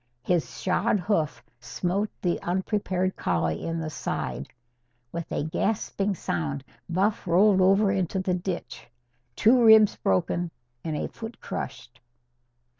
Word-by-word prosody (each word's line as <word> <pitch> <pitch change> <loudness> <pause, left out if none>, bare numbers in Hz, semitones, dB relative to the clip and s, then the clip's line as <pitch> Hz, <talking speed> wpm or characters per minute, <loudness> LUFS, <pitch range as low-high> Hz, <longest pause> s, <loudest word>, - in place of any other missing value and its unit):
His 175 +2 -1
shod 195 +3 +1
hoof 175 -5 -1 0.2
smote 185 - -2
the 175 -2 0
unprepared 185 0 -1
collie 80 -2 -1
in 165 0 -2
the 155 -1 -4
side. 65 - -3 0.6
With 170 -1 -5
a - - -1
gasping 195 +4 -1
sound, 75 - -3 0.3
Buff 200 +4 0
rolled 190 +3 +5
over 195 +2 +4
into 190 -1 -1
the 185 -1 0
ditch, 180 0 -4 0.5
two 240 +2 +5
ribs 220 -2 +7
broken 170 - 0 0.3
and 155 -2 -2
a - - -2
foot 225 +1 -9
crushed. 120 -1 -6
180 Hz, 125 wpm, -26 LUFS, 160-200 Hz, 0.6 s, ribs